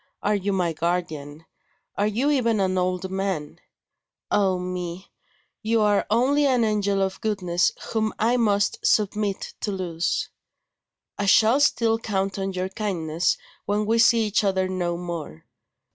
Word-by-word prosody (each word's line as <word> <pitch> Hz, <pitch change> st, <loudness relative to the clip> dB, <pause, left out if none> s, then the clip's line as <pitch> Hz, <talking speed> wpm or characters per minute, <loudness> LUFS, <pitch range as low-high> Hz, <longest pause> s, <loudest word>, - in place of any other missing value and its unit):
are 210 Hz, -, +2 dB
you 200 Hz, 0 st, -1 dB
my 180 Hz, -4 st, 0 dB
guardian? 160 Hz, -2 st, -3 dB, 0.5 s
are 205 Hz, -, +1 dB
you 245 Hz, +8 st, +1 dB
even 235 Hz, -6 st, +2 dB
an 190 Hz, -1 st, +1 dB
old 185 Hz, 0 st, -1 dB
man? 190 Hz, -6 st, -3 dB, 0.7 s
Ah 190 Hz, -2 st, +2 dB
me! 180 Hz, 0 st, -5 dB, 0.5 s
you 225 Hz, +1 st, +1 dB
are 210 Hz, -1 st, +2 dB
only 270 Hz, +6 st, +3 dB
an 250 Hz, -3 st, +2 dB
angel 200 Hz, -2 st, +1 dB
of 190 Hz, 0 st, -3 dB
goodness 185 Hz, -5 st, +1 dB, 0.2 s
whom 220 Hz, -1 st, 0 dB
I 230 Hz, +3 st, +2 dB
must 205 Hz, -4 st, +1 dB
submit 205 Hz, -1 st, 0 dB
to 210 Hz, -, -2 dB
lose. 175 Hz, -3 st, -2 dB, 0.9 s
I 200 Hz, -, 0 dB
shall 225 Hz, +6 st, +5 dB
still 230 Hz, -5 st, +2 dB
count 195 Hz, -3 st, -2 dB
on 195 Hz, 0 st, -2 dB
your 185 Hz, 0 st, -2 dB
kindness 175 Hz, -5 st, -1 dB, 0.3 s
when 210 Hz, +1 st, 0 dB
we 225 Hz, +2 st, +2 dB
see 230 Hz, 0 st, +5 dB
each 210 Hz, 0 st, +1 dB
other 190 Hz, -2 st, +1 dB
no 175 Hz, -2 st, -2 dB
more. 170 Hz, -, -6 dB
195 Hz, 145 wpm, -24 LUFS, 180-215 Hz, 0.9 s, shall